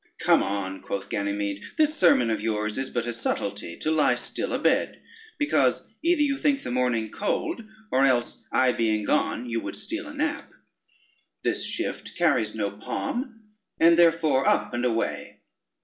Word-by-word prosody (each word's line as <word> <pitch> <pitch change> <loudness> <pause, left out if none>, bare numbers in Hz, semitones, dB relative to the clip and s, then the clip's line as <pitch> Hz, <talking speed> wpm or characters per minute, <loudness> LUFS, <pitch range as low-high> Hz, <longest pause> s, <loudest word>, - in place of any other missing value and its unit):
"Come - - +4
on," 95 -1 -3
quoth 100 0 -5
Ganymede, 100 0 -2 0.2
"this 305 -1 +4
sermon 125 -10 +4
of 110 -2 -1
yours 105 +1 -1
is 135 - -2
but 120 -1 -2
a 120 - -3
subtlety 100 -5 -3
to 155 - -1
lie 155 -1 +3
still - - -3
a - - +1
bed, - - +1 0.4
because 290 - +1
either 335 -2 +3
you 280 -2 +1
think 280 -2 +1
the - - -4
morning 120 -3 0
cold, 320 - -2 0.3
or 130 - +3
else 120 -3 0
I 125 +1 +3
being 110 -3 0
gone, 125 - 0
you 115 -1 -1
would - - -5
steal 330 -2 -4
a 290 - -8
nap: 295 +1 -2 0.9
this - - 0
shift - - -3
carries 140 -12 +2
no 100 -2 -1
palm, 225 - -4 0.4
and 165 +1 +6
therefore 165 -5 +4
up - - +1
and 120 +1 -1
away. 115 -2 -2
125 Hz, 165 wpm, -26 LUFS, 110-175 Hz, 0.9 s, and